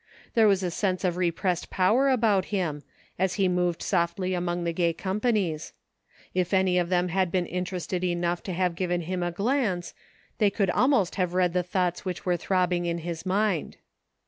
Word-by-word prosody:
There 225 -3 +5
was 195 -2 +3
a 180 - -1
sense 185 +1 -1
of 180 -2 +1
repressed 175 0 -1
power 220 +9 +3
about 220 -7 +3
him, 170 -8 -2 0.4
as 190 0 +1
he 195 -2 +2
moved 180 -1 0
softly 180 +1 0
among 175 -1 -1
the 170 0 -1
gay 170 -1 +1
companies. 195 -4 -1 0.6
If 185 +1 +1
any 185 -1 +3
of 175 -1 -1
them 180 0 +1
had 185 0 +1
been 180 -2 +1
interested 180 0 -3
enough 175 -1 0
to 185 - -3
have 180 0 0
given 175 0 -1
him 180 +2 -3
a 175 - 0
glance, 200 -3 -1 0.5
they 210 - +5
could 195 -2 0
almost 245 -8 +2
have 180 -2 0
read 180 -2 +2
the 180 - +2
thoughts 180 0 -1
which 185 -3 -5
were 180 -1 +2
throbbing 180 0 0
in 170 0 -1
his 170 +1 -5
mind. 195 -3 0
180 Hz, 185 wpm, -27 LUFS, 175-190 Hz, 0.6 s, There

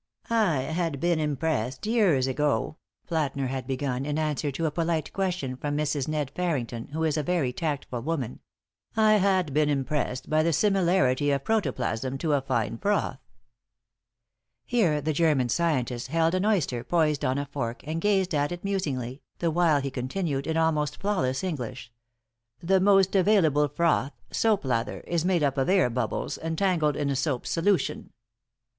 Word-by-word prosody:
"I 200 - +2
had 160 +1 -2
been 170 0 +1
impressed, 140 - -1
years 200 - +3
ago," 145 0 0 0.3
Plätner 140 -5 -1
had 130 -2 -4
begun, 130 -1 -2
in 150 +1 -2
answer 150 -1 -1
to 165 +5 -2
a 155 - +1
polite 165 -1 -1
question 180 -9 -2
from 145 +2 -3
Mrs. 150 -2 -1
"Ned" 150 -3 -2
Farrington, 135 -10 -2
who 160 +3 -3
is 160 -1 +1
a - - +1
very 150 -5 0
tactful 145 -6 -3
woman; 135 -4 -3 0.6
"I 215 -1 +5
had 185 -6 +1
been 150 0 +2
impressed 135 -2 -1
by 155 0 +2
the 165 +1 +1
similarity 170 -8 +2
of 140 -1 0
protoplasm 135 - -1
to 155 +1 0
a 140 - +2
fine 115 -3 -1
froth." 200 -10 0 1.5
Here 180 -12 +2
the 155 +2 -1
German 145 -5 +2
scientist 125 -6 0
held 165 +3 +1
an 185 +2 +1
oyster 145 - 0
poised 155 0 +1
on 130 -1 +1
a 140 - -2
fork 135 -4 -4
and 160 +2 -3
gazed 190 -3 +2
at 145 +1 +1
it 175 0 -6
musingly, 140 -10 -2 0.2
the 170 -1 0
while 160 -3 +3
he 135 0 -3
continued, 135 +2 -2
in 160 0 0
almost 150 -3 +1
flawless 130 -10 0
English: 130 -8 -5 0.7
"The 190 +3 +2
most 195 0 +4
available 170 -7 +4
froth, 145 -1 +1 0.2
soap 215 -8 +1
lather, 120 -3 -1
is 170 -2 -1
made 180 -3 +2
up 140 -1 +1
of 135 - +1
air 185 -10 +3
bubbles 115 -2 -2
entangled 160 -2 +1
in 140 -2 -1
soap 135 -2 -1
solution. 170 +9 0
150 Hz, 165 wpm, -27 LUFS, 135-175 Hz, 1.5 s, I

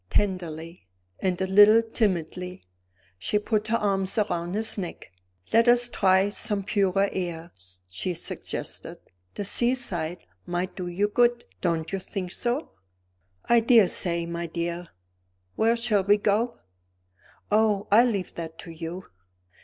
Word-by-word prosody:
Tenderly, 170 - -2 0.3
and 185 -2 -1
a 190 - +1
little 205 +4 +7
timidly, 180 -5 -2 0.6
she 210 - 0
put 210 0 -1
her 230 +1 +2
arm 195 -3 0 0.2
around 175 +2 -2
his 220 +1 -1
neck. 180 - -6 0.4
"Let 230 +1 +5
us 240 0 +4
try 190 -2 +3
some 205 -1 -1
purer 195 -1 +2
air," 170 -2 -4 0.4
she 95 - -3
suggested; - - -5 0.4
"the 205 - -4
seaside 185 -9 -1 0.2
might 180 +1 -2
do 180 -2 -5
you 185 +4 0
good. 240 +2 +2 0.2
Don't 165 -3 -1
you 195 - -2
think 185 -1 -5
so?" 245 - 0 0.7
"I 235 - +5
daresay, 190 -7 +3
my 170 0 -4
dear. 170 +1 -4 0.7
Where 230 +2 +2
shall 225 -4 +1
we 205 +2 +4
go?" 215 +4 0 0.9
"Oh, 210 -1 +2
I 220 +4 +7
leave 205 -7 -1
that 165 -1 -7
to 170 - -9
you." 165 +3 -7
195 Hz, 135 wpm, -26 LUFS, 175-220 Hz, 0.9 s, little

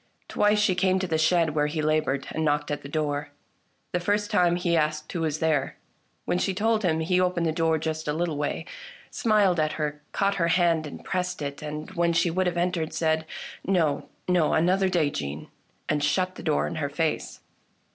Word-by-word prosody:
Twice 210 0 +2
she 210 -2 +3
came 185 +1 +2
to 185 - -1
the 160 -3 0
shed 165 0 +3
where 150 -1 +2
he 155 +2 -3
laboured, 155 -3 +1
and 160 - -2
knocked 150 -1 0
at 145 - -2
the 140 - -9
door. 145 -1 -2 0.6
The 180 - 0
first 205 +4 0
time, 175 -4 +3
he 175 -1 +1
asked 155 -1 0
who 170 - -3
was 155 -2 0
there. 155 -4 0 0.5
When 180 - 0
she 190 0 0
told 220 +2 +2
him 160 -5 +1
he 180 +3 +2
opened 180 -2 +1
the 160 - +2
door 165 0 +1
just 160 0 -3
a 150 - +1
little 165 0 -1
way, 150 +2 -2 0.5
smiled 205 -6 +2
at 155 0 +1
her, 150 -1 -3
caught 200 0 +1
her 170 - +3
hand 170 -2 +2
and 145 - -10
pressed 180 -1 -2
it, 140 0 -5
and, 150 +2 -6
when 170 -2 +1
she 170 0 +2
would 185 +2 +1
have 175 - -1
entered, 170 -2 -1
said, 160 -1 0 0.2
" - - -14
No, 165 -7 +1 0.2
no, 180 -4 +3
another 185 +4 +3
day, 165 -5 +1
Jeanne! 70 - -5 0.2
" - - -41
and 150 -1 0
shut 185 +6 +1
the - - -10
door 75 +1 +1
in 75 - -4
her - - -1
face. - - -2
165 Hz, 215 wpm, -26 LUFS, 155-180 Hz, 0.6 s, she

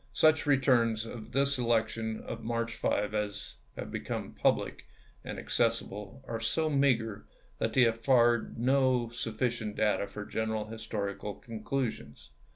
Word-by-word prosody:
Such 155 -1 +4
re 145 -2 +5
turns 115 -4 +3
of 115 -1 -8
this 140 0 +2
election 110 -2 0
of 115 - -7
March 115 0 -1
5 105 -2 0
as 105 -1 -3 0.2
have - - -6
become - - -4
public - - 0 0.4
and - - -6
accessible 115 +1 -1
are 115 -1 -3
so 155 +7 0
meager 115 -7 +1 0.3
that - - 0
they 130 - +6
afford 120 0 +3
no 130 -1 +3
sufficient 115 -1 -2
data 105 -1 +1
for 105 - -7
general 110 -1 -2
historical 105 -2 -4
con 115 -2 -8
clusions. 110 - -3
115 Hz, 140 wpm, -31 LUFS, 110-125 Hz, 0.4 s, they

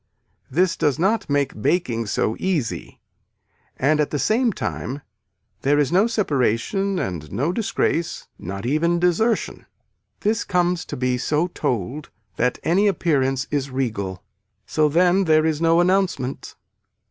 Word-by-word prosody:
This 180 +5 +2
does 145 -3 +1 0.3
make 140 -6 0
baking 120 -8 0
so 110 +2 0
easy 170 -11 -2 0.8
and 150 +3 +2
at 150 - +1
the 145 - -2
same 230 - +2
time 135 - -4 0.6
there 145 +2 +2
is 145 -1 +2
no 195 +5 +4
separation 195 - 0
and 85 - -4
no 135 - 0
disgrace 180 -4 -1
not 95 +4 -6
even 165 +6 +1
desertion. 180 +7 0 0.5
This 215 +1 +1
comes 180 -1 0
to - - -6
be 125 0 0
so 155 +7 0
told 135 - -3 0.3
that 125 +2 +1
any 190 +5 +3
appearance 135 -8 +1
is 140 -2 -1
regal. 105 -8 -3 0.4
So 155 +6 +2
then 180 +4 +3
there 155 -1 +4
is 160 -1 0
no 165 0 +4
announcement. 175 -8 0
150 Hz, 135 wpm, -22 LUFS, 130-180 Hz, 0.8 s, no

